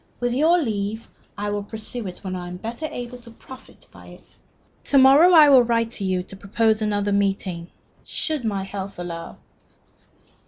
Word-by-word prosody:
With 245 0 -1
your 315 +7 +3
leave, 220 - -3 0.3
I 205 0 -3
will 205 0 -2
pursue 220 +2 -6
it 180 - -9
when 185 -1 -4
I 180 -1 -6
am 180 0 -7
better 235 - -5
able 245 -2 -7
to 235 -1 -14
profit 260 +3 -14
by - - -15
it. - - -16 0.5
To 280 - +3
morrow 275 +7 +7
I 315 -4 +8
will 265 -3 +7
write 230 -1 0
to 205 - +1
you 185 -1 -1
to 195 - -8
propose 220 +3 0
another 205 -1 -1
meeting 195 -4 -1 0.3
should 310 -5 -3
my 200 -4 -2
health 195 0 -7
allow." 170 -1 -7
215 Hz, 180 wpm, -22 LUFS, 195-245 Hz, 0.5 s, I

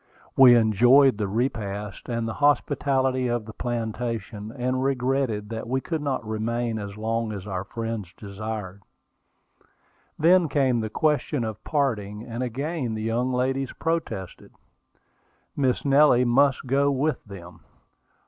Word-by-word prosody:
We 125 -2 +8
enjoyed 120 +3 +5
the 105 - 0
repast 105 -3 -3
and 115 -1 -2
the 110 - -3
hospitality 135 -2 +2
of 120 -2 -1
the 110 - -9
plantation, 115 -3 -4
and 130 0 -2
regretted 130 -5 0
that 115 0 -5
we 130 +2 0
could 160 +3 -3
not 135 -5 -2
remain 115 +1 -2
as 100 0 -7
long 115 +1 -2
as 100 -2 -6
our 95 -3 -3
friends 115 -4 -5
desired. 100 -1 -6 1.4
Then 170 +1 +4
came 130 -5 +2
the 110 -1 -3
question 150 0 0
of 110 -2 -5
parting, 110 -8 -1
and 115 +1 -6
again 130 0 -3
the 110 - -4
young 120 +3 0
ladies 130 +1 -1
protested. 160 - -4 1.0
Miss 130 -2 0
Nellie 140 -3 +5
must 135 +3 +3
go 140 +2 +2
with 140 0 -1
them. 90 -4 -11
120 Hz, 135 wpm, -25 LUFS, 110-135 Hz, 1.4 s, We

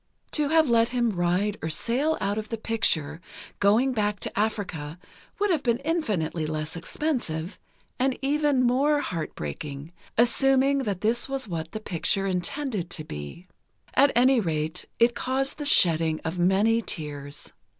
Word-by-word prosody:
To 295 -2 +1
have 320 -1 +4
let 230 -1 +3
him 240 -2 +1
ride 185 +3 0
or 160 - -2
sail 255 - 0
out 205 +2 -1
of 215 - -7
the 225 - -3
picture, 170 -9 0 0.4
going 225 +7 +4
back 210 -3 0
to - - -5
Africa, 180 -8 -2 0.4
would 410 -1 +1
have 320 -5 +2
been 235 -3 +1
infinitely 210 - -1
less 155 +1 -3
expensive, 175 - -3 0.4
and 260 0 +1
even 285 -1 +2
more 280 +4 +3
heartbreaking, 145 - -5 0.3
assuming 270 +3 +4
that 200 -3 -2
this 235 +4 0
was 270 -3 -2
what 165 -3 -4
the 215 - -4
picture 195 0 0
intended 190 - -2
to 155 - -5
be. 75 - -8 0.5
At 280 +1 +5
any 255 +1 +5
rate, 160 -5 -2
it 235 +1 +4
caused 270 +4 -2
the 295 - -3
shedding 165 - +3
of 165 +2 -3
many 200 +6 +3
tears. 145 -6 -6
215 Hz, 150 wpm, -26 LUFS, 165-260 Hz, 0.5 s, At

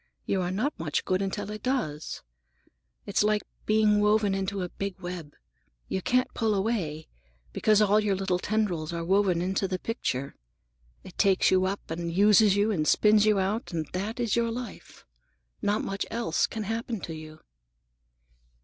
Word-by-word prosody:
You 195 - 0
are 175 - -1
not 220 +11 -1
much 155 -3 -2
good 185 +1 +1
until 200 +1 -3
it 215 - -6
does. 230 - -2 0.8
It's 200 - +1
like 210 0 +2 0.2
being 215 -1 +4
woven 210 -1 +3
into 195 0 -2
a 180 - -4
big 195 +1 -5
web. 175 -5 -7 0.5
You 190 - -2
can't 250 +6 +1
pull 220 -3 +1
away, 190 -7 -2 0.5
because 215 -1 +4
all 210 +1 +4
your 210 -2 +1
little 190 -1 0
tendrils 180 -7 -1
are 170 0 -3
woven 190 -2 +2
into 190 +1 0
the 185 0 -2
picture. 140 - -3 0.7
It - - -13
takes 195 -2 +4
you 185 0 +3
up, 195 -3 -4
and 170 +1 -3
uses 205 +2 +5
you, 205 +2 +2
and 155 -7 0
spins 210 0 +5
you 210 -1 +4
out; 200 +5 -1
and 160 -2 -1
that 205 +6 -3
is 235 -4 +1
your 235 0 +1
life. 240 +1 -8 0.6
Not 205 0 +1
much 195 0 -3
else 230 -8 0
can 220 - -5
happen 225 +1 -3
to 165 - -6
you." 155 0 -10
200 Hz, 170 wpm, -27 LUFS, 180-215 Hz, 0.8 s, uses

